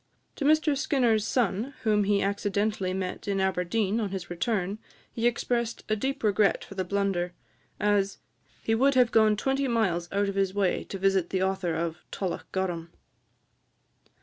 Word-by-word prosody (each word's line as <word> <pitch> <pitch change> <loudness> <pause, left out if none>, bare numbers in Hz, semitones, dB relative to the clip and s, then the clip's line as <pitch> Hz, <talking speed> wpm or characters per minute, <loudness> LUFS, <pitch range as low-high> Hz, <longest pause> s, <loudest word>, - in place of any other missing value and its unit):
To 280 - -2
Mr 305 0 +4
Skinner's 245 -6 +2
son, 235 +2 0
whom 210 -3 +3
he 200 0 +2
accidentally 200 -1 0
met 185 +1 -4
in 200 -1 0
Aberdeen 190 +3 0
on 210 -3 -1
his 185 -2 -6
return, 195 +2 -1 0.3
he 230 +1 +1
expressed 235 0 -1
a 215 - +3
deep 265 +5 -3
regret 210 -1 +3
for - - -10
the 190 -1 -2
blunder, 185 -2 -1 0.5
as 205 -1 +1 0.5
"he 225 - +1
would 270 +4 +3
have 250 -2 +4
gone 215 -1 +4
twenty 270 +4 0
miles 190 -8 0
out 200 +1 +1
of 200 - -2
his 195 -1 0
way 195 -3 +1
to 195 - -6
visit 190 -2 +2
the 190 -1 0
author 190 -3 -1
of 165 0 -2
'Tullochgorum.'" 180 -2 -3
200 Hz, 160 wpm, -27 LUFS, 190-225 Hz, 0.5 s, Mr